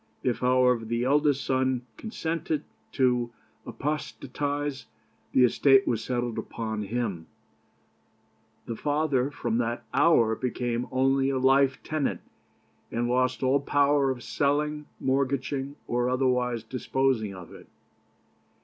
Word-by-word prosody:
If, 125 -3 0
however, 125 -2 +3
the 115 +2 -1
eldest 145 +1 +2
son 130 -1 0
consented 160 -7 -3 0.3
to 125 -3 +2 0.4
apostatize, 145 -2 -3 0.4
the 130 - +5
estate 135 +2 +5
was 115 -2 0
settled 120 -2 -2
upon 110 -2 -4
him, 105 -6 -3 1.4
the 115 - -4
father 145 -1 0
from 120 -5 -2
that 120 0 -2
hour 130 -6 +4
became 120 0 -2
only 135 +1 +2
a 135 - 0
life 135 +1 +3
tenant, 155 -3 -2 0.7
and 120 +1 -1
lost 125 +1 +1
all 130 +2 +3
power 140 0 +2
of 125 -2 -3
selling, 150 +1 0
mortgaging, 135 +1 -1
or 120 +1 0
otherwise 125 -2 +1
disposing 125 -3 -1
of 90 -2 -11
it. - - -13
130 Hz, 115 wpm, -27 LUFS, 120-140 Hz, 1.4 s, the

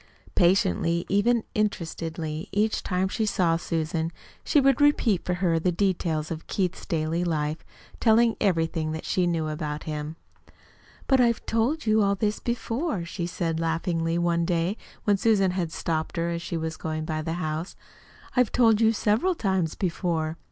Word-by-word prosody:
Patiently, 170 - +2
even 220 +4 +3
interestedly, 165 -4 -3
each 210 +2 +1
time 185 0 0
she 215 +3 -1
saw 175 -5 +2
Susan, 165 -1 -2 0.3
she 300 - +3
would 275 +1 +3
repeat 245 -10 +3
for 180 - -1
her 175 -2 +1
the 180 +2 +1
details 170 -4 0
of 165 -1 -6
Keith's 185 -2 -2
daily 165 -1 0
life, 155 -2 -1 0.4
telling 230 0 +4
everything 165 -4 +1
that 160 - -6
she 180 -1 +1
knew 165 -2 0
about 150 -1 -4
him. 150 0 -4 0.9
"But 265 -2 +4
I've 235 -2 +2
told 240 +8 0
you 215 0 +4
all 200 0 +2
there 210 +2 +1
is, 210 - -6
before," 235 - -2
she 170 0 -4
said 170 -2 -2
laughingly 165 0 0
one 170 -1 +1
day 170 0 +1
at 215 - -6
last, - - -21
when 205 -3 +3
Susan 195 -3 +3
had 180 -3 -2
stopped 160 +1 -2
her 170 0 0
as 170 0 -3
she 170 - -3
was 160 0 -3
going 155 0 -3
by 155 -1 -2
the 160 +1 -3
house. 160 0 -3 0.6
"I've 250 -3 +3
told 225 -3 +4
it 225 0 +4
several 225 - +2
times 190 - 0
before." 165 -3 -1
175 Hz, 175 wpm, -26 LUFS, 160-210 Hz, 0.9 s, telling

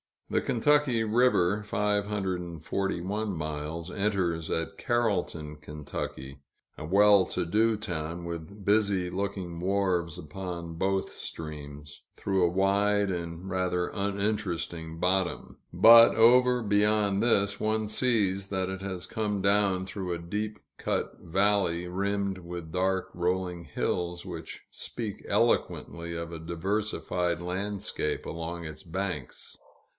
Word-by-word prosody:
The - - +2
Kentucky 130 -1 +2
River 105 -4 +3
(541 100 -1 -1
miles) 80 +2 -4
enters 90 -5 0
at 80 0 -2
Carrollton, 90 -10 -1
Ky., 75 -2 -6 0.4
a 75 - -6
well 100 +2 +6
to - - -2
do 110 +6 +3
town, 85 -5 -4
with 85 +4 -7
busy 100 -3 +2
looking 90 -2 -3
wharves 90 -3 0
upon 85 0 -6
both 95 +2 0
streams, 75 -2 -8
through 95 -2 +1
a - - +3
wide 100 +2 +2
and 85 0 -5
rather 90 -1 0
uninteresting 100 -5 -2
bottom. 95 +1 0 0.2
But, 115 0 +9
over 125 +1 +5
beyond 105 -1 +3
this, 100 -4 +3
one 110 0 0
sees 105 -5 +2
that 95 -1 -1
it 95 0 -5
has 95 -2 -4
come 105 -2 -2
down 100 -1 +3
through 95 -2 -4
a - - -2
deep 105 +5 -4 0.2
cut - - -2
valley, 95 -1 +1
rimmed 100 +1 -1
with 85 -2 -7
dark, 95 +1 0
rolling 90 -1 -1
hills, 85 -1 -2
which - - -8
speak 110 -4 -6
eloquently 85 0 0
of 85 0 -4
a 85 - -6
diversified 90 0 -1
landscape 95 -3 -2
along 85 +1 -5
its 80 -1 -7
banks. 90 -5 -5
95 Hz, 120 wpm, -28 LUFS, 85-105 Hz, 0.4 s, But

